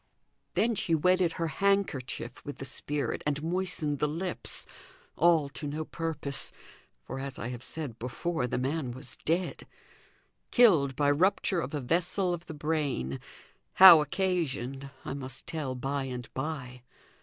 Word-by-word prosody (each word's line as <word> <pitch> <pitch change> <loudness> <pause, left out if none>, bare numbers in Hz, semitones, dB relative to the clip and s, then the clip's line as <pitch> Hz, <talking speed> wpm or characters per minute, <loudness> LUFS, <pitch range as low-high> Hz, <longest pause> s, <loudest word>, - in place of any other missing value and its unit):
Then 230 +1 +3
she 170 -5 +1
wetted 180 +1 +3
her 165 - -2
handkerchief 155 -9 -1
with 145 - -7
the 135 - -6
spirit, 145 +1 -2
and 150 0 0
moistened 165 -4 -1
the 150 - +2
lips; 170 +4 -4 0.5
all 165 -3 +4
to 145 +2 -6
no 155 +2 -3
purpose; 155 -4 -2 0.5
for, 135 - -6
as 135 -1 -5
I 115 - -4
have 125 -1 -6
said 130 -3 -6
before, 125 +3 -2
the - - -2
man 130 0 -1
was 130 0 -11
dead 175 +3 -1 0.8
killed 165 - +5
by 145 -1 +3
rupture 185 +3 +2
of 160 - -4
a 145 - -2
vessel 180 +6 +1
of 175 0 -6
the 160 - -7
brain; 145 - -1 0.5
how 180 -4 +11
occasioned 145 -6 -1 0.2
I - - -3
must 135 -1 -5
tell 150 -6 -3
by 135 +2 -2
and 125 -2 -5
by. 130 -3 -4
150 Hz, 150 wpm, -30 LUFS, 135-170 Hz, 0.8 s, how